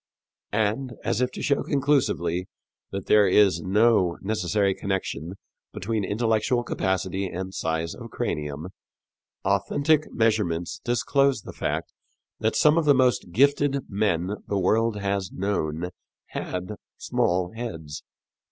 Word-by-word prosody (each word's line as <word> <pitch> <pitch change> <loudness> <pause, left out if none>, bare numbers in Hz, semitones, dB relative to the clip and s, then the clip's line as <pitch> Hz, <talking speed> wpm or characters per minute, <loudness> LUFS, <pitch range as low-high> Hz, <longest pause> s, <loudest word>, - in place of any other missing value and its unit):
And, 110 +4 0
as 115 - 0
if 125 - +2
to - - -6
show 140 -2 +2
conclusively 125 - +1 0.4
that 95 0 -5
there 105 -2 +5
is 95 -3 +4
no 100 -2 +3
necessary 100 -1 +1
connection 95 -4 -3 0.4
between 110 +2 -2
intellectual 115 +4 +1
capacity 95 -2 -1
and 95 +1 -5
size 80 -1 -2
of - - -9
cranium, 75 +3 -3 0.8
authentic 155 +1 +2
measurements 105 -7 0
disclose 135 +3 +2
the - - -9
fact - - -3 0.5
that 110 0 0
some 150 +2 +5
of 165 - -1
the 145 -2 +6
most 125 -8 +2
gifted 140 +4 +2
men 100 -1 0
the 100 - 0
world 110 +4 +2
has 100 -2 -1
known 90 -3 -2 0.4
had 90 +3 -4 0.2
small 90 0 0
heads. 80 - -6
100 Hz, 125 wpm, -25 LUFS, 90-120 Hz, 0.8 s, the